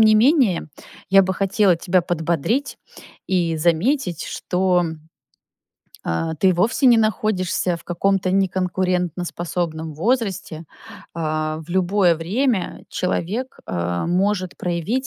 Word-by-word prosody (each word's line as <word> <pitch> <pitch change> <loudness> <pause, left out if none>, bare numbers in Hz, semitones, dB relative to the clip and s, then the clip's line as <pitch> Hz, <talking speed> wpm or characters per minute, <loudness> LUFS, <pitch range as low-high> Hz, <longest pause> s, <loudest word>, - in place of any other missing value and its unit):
не 215 -1 +6
менее, 230 - +3 0.4
я 195 0 +7
бы 190 0 -1
хотела 195 -1 +2
тебя 180 +1 +1
подбодрить 175 - -1 0.5
и 175 -3 0
заметить, 175 - +1
что, 180 -1 0 1.2
а, 160 - -1
ты 185 +4 +3
вовсе 215 +10 +1
не 240 -2 +7
находишься 190 -4 0
в - - -17
каком-то 185 +1 0
неконкурентоспособном 180 -3 -1
возрасте. 190 - -1 0.5
А, 155 -1 -2
в - - -12
любое 185 0 +3
время 205 - -1
человек, 210 +8 -2
а, 85 - -2
может 185 +1 0
проявить 185 +10 -2
180 Hz, 110 wpm, -21 LUFS, 170-205 Hz, 1.2 s, я